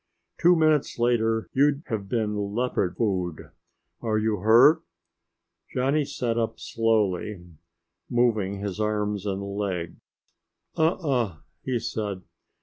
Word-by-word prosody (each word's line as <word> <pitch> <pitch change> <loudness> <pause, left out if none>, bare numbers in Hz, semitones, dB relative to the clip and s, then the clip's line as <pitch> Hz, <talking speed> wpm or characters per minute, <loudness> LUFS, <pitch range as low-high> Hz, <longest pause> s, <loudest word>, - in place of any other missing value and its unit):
"Two 175 +1 +6
minutes 155 -3 +2
later 115 -2 +1
you'd 145 +2 +2
have 100 -4 -4
been 110 -2 0 0.2
leopard 115 -7 -1
food. 90 -7 -2 0.5
Are 110 -2 0
you 110 0 +1
hurt?" 120 - +6 0.9
Johnny 140 +4 +2
sat 120 -3 -2
up 115 - -2
slowly, 105 -4 0 0.6
moving 110 -5 +1
his 100 0 -4
arms 105 -1 -1
and 100 0 -2
legs. 100 -4 -4 0.8
"Uh 160 +2 +3
uh," 125 - -1 0.3
he 130 -2 -1
said. 105 -4 -4
110 Hz, 115 wpm, -26 LUFS, 100-125 Hz, 0.9 s, Two